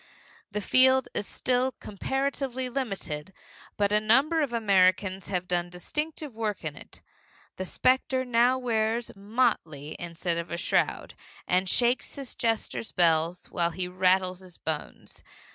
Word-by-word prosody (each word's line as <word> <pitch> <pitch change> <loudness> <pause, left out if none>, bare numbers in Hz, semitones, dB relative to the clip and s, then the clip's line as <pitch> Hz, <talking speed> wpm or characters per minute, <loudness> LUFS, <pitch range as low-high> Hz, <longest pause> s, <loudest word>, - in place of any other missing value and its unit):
The 210 0 -3
field 260 +4 +5
is 205 - -2
still 255 +1 0
comparatively 265 +3 -3
limited, 195 - -4 0.5
but 205 -1 +2
a 210 - +4
number 270 +10 +3
of 285 -5 0
Americans 195 -3 +2
have 180 -2 -2
done 175 -1 0
distinctive 300 - -4
work 215 -4 -3
in 150 -2 -3
it. - - -13 0.5
The 185 - -3
specter 260 +4 +1
now 245 +1 +3
wears 230 -1 -1
motley 200 - -1
instead 170 0 -3
of 170 - -5
a 170 - -3
shroud, - - 0 0.3
and 185 +1 +2
shakes 245 +4 +1
his 275 -3 -6
jester's 225 -1 -2
bells 165 0 +2
the - - -17
while 170 -1 +1
he 180 +1 -3
rattles 185 0 +2
his 185 -2 -12
bones. 155 -2 -6
210 Hz, 145 wpm, -27 LUFS, 180-255 Hz, 0.5 s, field